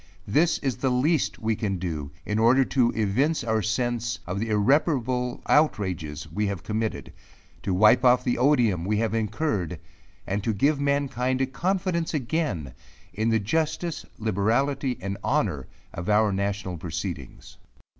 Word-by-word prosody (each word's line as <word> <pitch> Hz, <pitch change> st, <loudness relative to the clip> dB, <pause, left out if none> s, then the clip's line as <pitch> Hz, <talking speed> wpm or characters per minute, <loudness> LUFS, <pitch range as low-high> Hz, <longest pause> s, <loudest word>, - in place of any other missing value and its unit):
This 160 Hz, +11 st, +2 dB
is 135 Hz, -3 st, -1 dB
the 135 Hz, -, 0 dB
least 135 Hz, +5 st, +1 dB
we 110 Hz, -1 st, -1 dB
can 100 Hz, -3 st, -2 dB
do 80 Hz, -5 st, -4 dB, 0.2 s
in 105 Hz, +1 st, -1 dB
order 125 Hz, +4 st, +5 dB
to 125 Hz, -3 st, +2 dB
evince 120 Hz, +10 st, +1 dB
our 110 Hz, -1 st, +1 dB
sense 120 Hz, +1 st, -1 dB
of 90 Hz, +3 st, -3 dB
the 115 Hz, +2 st, -2 dB
irreparable 125 Hz, +2 st, +1 dB
outrages 95 Hz, -, +1 dB
we 105 Hz, 0 st, -1 dB
have 100 Hz, -4 st, -4 dB
committed, 110 Hz, 0 st, -3 dB, 0.5 s
to 95 Hz, -, -2 dB
wipe 105 Hz, +6 st, +5 dB
off 125 Hz, 0 st, +5 dB
the 125 Hz, -, 0 dB
odium 120 Hz, -, +3 dB
we 105 Hz, +3 st, 0 dB
have 110 Hz, 0 st, 0 dB
incurred, 105 Hz, -, -1 dB, 0.5 s
and 100 Hz, +1 st, -2 dB
to 110 Hz, -, 0 dB
give 140 Hz, +8 st, +2 dB
mankind 135 Hz, -3 st, 0 dB
a 135 Hz, -, +2 dB
confidence 170 Hz, +4 st, -1 dB
again 120 Hz, -, -2 dB, 0.4 s
in 110 Hz, +4 st, 0 dB
the 115 Hz, -, +3 dB
justice, 160 Hz, -, -1 dB
liberality, 120 Hz, +6 st, 0 dB
and 100 Hz, +1 st, -4 dB
honour -, -, 0 dB, 0.3 s
of 85 Hz, +4 st, -5 dB
our 105 Hz, 0 st, +4 dB
national 100 Hz, -2 st, -2 dB
proceedings. -, -, -6 dB
115 Hz, 150 wpm, -25 LUFS, 100-135 Hz, 0.5 s, order